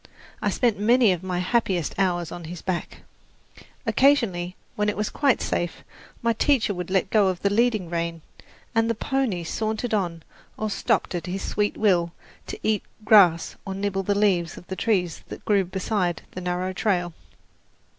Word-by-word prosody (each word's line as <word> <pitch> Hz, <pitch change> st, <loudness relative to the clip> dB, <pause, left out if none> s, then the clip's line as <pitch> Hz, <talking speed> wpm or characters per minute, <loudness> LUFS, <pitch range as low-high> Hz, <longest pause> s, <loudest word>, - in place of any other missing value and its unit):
I -, -, +1 dB
spent 235 Hz, -5 st, +1 dB
many 230 Hz, 0 st, +5 dB
of 180 Hz, -2 st, -1 dB
my 185 Hz, -1 st, -3 dB
happiest 180 Hz, -3 st, 0 dB
hours 175 Hz, -4 st, 0 dB
on 175 Hz, -1 st, -7 dB
his 170 Hz, +1 st, -8 dB
back. 185 Hz, -3 st, -4 dB, 0.8 s
Occasionally, 200 Hz, -11 st, +2 dB, 0.2 s
when 210 Hz, 0 st, +1 dB
it 210 Hz, -, -3 dB
was 210 Hz, 0 st, -1 dB
quite 280 Hz, -4 st, +2 dB
safe, 175 Hz, 0 st, -2 dB, 0.4 s
my 230 Hz, 0 st, +3 dB
teacher 230 Hz, -2 st, +2 dB
would 180 Hz, -2 st, -5 dB
let 190 Hz, 0 st, +1 dB
go 205 Hz, -4 st, +4 dB
the 200 Hz, +3 st, -1 dB
leading 220 Hz, -4 st, +2 dB
rein, 165 Hz, -1 st, -3 dB, 0.5 s
and 225 Hz, 0 st, +2 dB
the 230 Hz, -, +1 dB
pony 245 Hz, -8 st, -1 dB
sauntered 220 Hz, +6 st, -2 dB
on 175 Hz, -6 st, -1 dB, 0.3 s
or 215 Hz, -1 st, -2 dB
stopped 195 Hz, -, 0 dB
at 175 Hz, -2 st, -4 dB
his 190 Hz, +2 st, -3 dB
sweet 205 Hz, 0 st, -1 dB
will 175 Hz, -5 st, +2 dB, 0.3 s
to -, -, -6 dB
eat 215 Hz, -1 st, +2 dB, 0.2 s
grass 185 Hz, -6 st, +5 dB
or 195 Hz, -, -5 dB
nibble 195 Hz, 0 st, -1 dB
the 200 Hz, +1 st, 0 dB
leaves 180 Hz, -5 st, +1 dB
of -, -, -11 dB
the 190 Hz, -, -5 dB
trees 185 Hz, -4 st, 0 dB
that -, -, -9 dB
grew 200 Hz, -2 st, +3 dB
beside 185 Hz, -1 st, -1 dB
the 185 Hz, -, -7 dB
narrow 180 Hz, +1 st, -2 dB
trail. 175 Hz, -3 st, 0 dB
195 Hz, 170 wpm, -25 LUFS, 175-215 Hz, 0.8 s, many